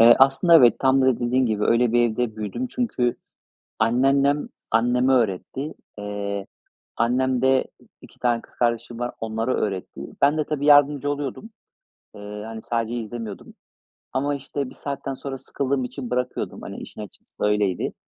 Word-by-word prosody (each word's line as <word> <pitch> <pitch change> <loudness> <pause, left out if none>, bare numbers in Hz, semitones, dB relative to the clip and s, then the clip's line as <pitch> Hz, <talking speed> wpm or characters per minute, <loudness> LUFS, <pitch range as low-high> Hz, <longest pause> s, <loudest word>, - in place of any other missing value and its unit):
Eee, 115 +1 +9
aslında 135 +6 +5
evet. 120 -7 +6
Tam 135 0 +3
da 130 -2 +2
dediğin 125 +1 +2
gibi, 105 -2 0
öyle 115 0 +3
bir 120 -1 +4
evde 110 -1 -2
büyüdüm. 110 - -3
Çünkü 125 - 0 0.6
anneannem 135 +5 +3 0.2
anneme 125 +3 +3
öğretti. 125 - -1 0.2
Eee, 100 -1 -4 0.5
annem 125 +2 +1
de 130 0 +4 0.4
2 - - -17
tane 120 -1 +1
kız - - -20
kardeşim 120 0 -1
var, 120 0 -3
onlara 115 +3 -1
öğretti. 95 -3 -3 0.2
Ben 145 +2 +5
de 155 - +1
tabii 145 -1 -2
yardımcı 145 -1 +5
oluyordum. 145 - -4 0.7
Eee, 105 0 -8
hani, 110 0 -7
sadece 115 0 -2
izlemiyordum 115 -2 -6 0.6
ama, 140 +2 0
işte, 140 0 -4
bir - - -14
saatten 140 -1 -4
sonra 135 0 -6
sıkıldığım 135 0 -2
için 125 0 -6
bırakıyordum, 125 0 -3
hani, - - -7
işin - - -9
açıkçası 105 0 -7
öyleydi. 105 -3 +1
125 Hz, 155 wpm, -23 LUFS, 115-135 Hz, 0.7 s, Eee